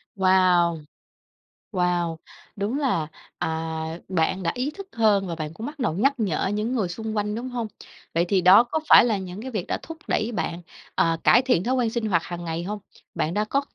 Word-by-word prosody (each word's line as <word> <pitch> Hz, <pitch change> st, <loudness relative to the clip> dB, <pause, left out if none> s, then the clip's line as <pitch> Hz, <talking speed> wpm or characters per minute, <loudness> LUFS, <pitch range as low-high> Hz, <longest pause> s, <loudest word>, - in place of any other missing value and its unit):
Wow! 185 Hz, -3 st, +4 dB, 0.9 s
Wow! 175 Hz, -3 st, 0 dB, 0.4 s
Đúng 210 Hz, +6 st, -2 dB
là, 195 Hz, -, 0 dB, 0.3 s
à, -, -, -1 dB, 0.6 s
bạn 185 Hz, +1 st, 0 dB
đã 165 Hz, -, +1 dB
ý 255 Hz, +4 st, -1 dB
thức 395 Hz, +4 st, -10 dB
hơn 210 Hz, -4 st, +3 dB
và 170 Hz, -, -3 dB
bạn 155 Hz, -1 st, -5 dB
cũng 220 Hz, +7 st, -7 dB
bắt 295 Hz, +2 st, -7 dB
đầu 230 Hz, -11 st, 0 dB
nhắc 255 Hz, -, +2 dB
nhở 195 Hz, -7 st, 0 dB
những 210 Hz, +5 st, -1 dB
người 210 Hz, -7 st, 0 dB
xung 220 Hz, +4 st, -5 dB
quanh, 210 Hz, 0 st, -1 dB
đúng 245 Hz, +3 st, -4 dB
hông? 240 Hz, -3 st, -3 dB, 0.5 s
Vậy 170 Hz, +1 st, +2 dB
thì 195 Hz, -2 st, +3 dB
đó 185 Hz, +6 st, +8 dB
có 245 Hz, +6 st, -2 dB
phải -, -, +9 dB
là 225 Hz, -4 st, +1 dB
những 190 Hz, +1 st, -7 dB
cái 260 Hz, +2 st, -6 dB
việc 210 Hz, -7 st, -3 dB
đã -, -, -1 dB
thúc 325 Hz, -, -8 dB
đẩy 220 Hz, +2 st, 0 dB
bạn, 175 Hz, -5 st, -3 dB, 0.3 s
ờ, 165 Hz, 0 st, +2 dB
cải -, -, +6 dB
thiện 250 Hz, -9 st, +2 dB
thói 255 Hz, +4 st, +1 dB
quen 245 Hz, -3 st, +1 dB
sinh 230 Hz, 0 st, -2 dB
hoạt 170 Hz, -5 st, +2 dB
hàng 175 Hz, -1 st, -6 dB
ngày 165 Hz, 0 st, -3 dB
hông? 205 Hz, +3 st, -4 dB, 0.4 s
Bạn 160 Hz, -, -1 dB
đã 210 Hz, +2 st, 0 dB
có 275 Hz, +6 st, +1 dB
205 Hz, 215 wpm, -24 LUFS, 175-235 Hz, 0.9 s, phải